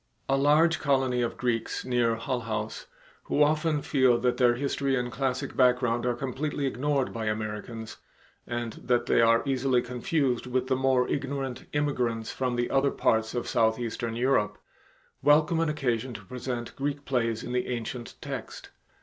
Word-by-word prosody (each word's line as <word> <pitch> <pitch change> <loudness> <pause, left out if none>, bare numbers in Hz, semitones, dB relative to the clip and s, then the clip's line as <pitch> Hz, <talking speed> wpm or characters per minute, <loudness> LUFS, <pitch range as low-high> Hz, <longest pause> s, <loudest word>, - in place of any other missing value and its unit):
A 135 - +2
large 150 +4 +4
colony 130 -4 +1
of 120 - -2
Greeks 120 -2 -1
near 120 -2 +2
Hull 120 +3 -2
House, 110 -2 -4 0.4
who 150 - +3
often 155 0 +1
feel 130 -4 +3
that 125 0 +1
their 120 -2 +4
history 140 +1 0
and 125 -1 -2
classic 130 +2 -2
background 125 -2 +3
are 120 - +1
completely 140 +3 -3
ignored 135 +1 0
by 115 -1 -3
Americans, 110 +1 -4 0.5
and 120 -2 -3
that 120 -1 +1
they 120 - +3
are 115 0 +4
easily 130 -2 +2
confused 125 +1 -1
with 125 0 0
the 130 0 +1
more 130 -1 +2
ignorant 135 -2 -3
immigrants 125 -6 -1
from 125 -2 -2
other 135 +1 +3
parts 110 -2 +1
of 120 - -2
southeastern 115 0 0
Europe, 115 -4 +1 0.6
welcome 150 +3 +4
an 165 -1 +1
occasion 130 -4 -1
to - - -9
present 125 -2 -5
Greek 140 +1 -3
plays 115 -4 0
in - - -5
the 125 0 -1
ancient 120 0 -5
text. - - -7
125 Hz, 160 wpm, -28 LUFS, 120-135 Hz, 0.6 s, large